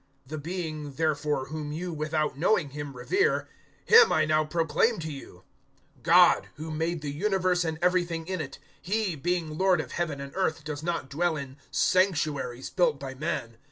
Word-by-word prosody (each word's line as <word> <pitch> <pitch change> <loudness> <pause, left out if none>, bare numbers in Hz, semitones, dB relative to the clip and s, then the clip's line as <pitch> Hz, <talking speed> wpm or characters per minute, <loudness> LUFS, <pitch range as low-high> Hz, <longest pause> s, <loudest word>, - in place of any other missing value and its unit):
"The 155 +3 -6
Being, 155 -3 -5
therefore, 150 -3 -1
whom 155 -1 -5
you, 170 +3 -4
without 155 -1 -1
knowing 155 -1 +1
Him, 145 -2 -7
revere, 385 - +1 0.4
Him 460 0 +8
I 155 - +3
now 155 0 +2
proclaim 165 +8 +1
to 160 -2 -5
you. 135 -10 -10 0.6
017:024 - - -28
GOD - - +6
who 160 +1 -6
made 165 +1 -2
the 145 - -3
universe 185 +2 +1
and 160 -1 -2
everything 175 -2 +1
in 185 -1 -3
it 135 - -7 0.2
He, 200 -2 -1
being 160 0 -2
Lord 190 -1 +4
of - - -5
Heaven 165 -5 -2
and 140 0 -7
earth, 165 -5 0
does 150 -1 -5
not 165 -4 -2
dwell 165 +2 0
in 135 -2 -7
sanctuaries 140 -5 +1
built 165 -6 +2
by 135 -1 -6
men. 130 -5 -4
155 Hz, 175 wpm, -27 LUFS, 145-175 Hz, 0.6 s, Him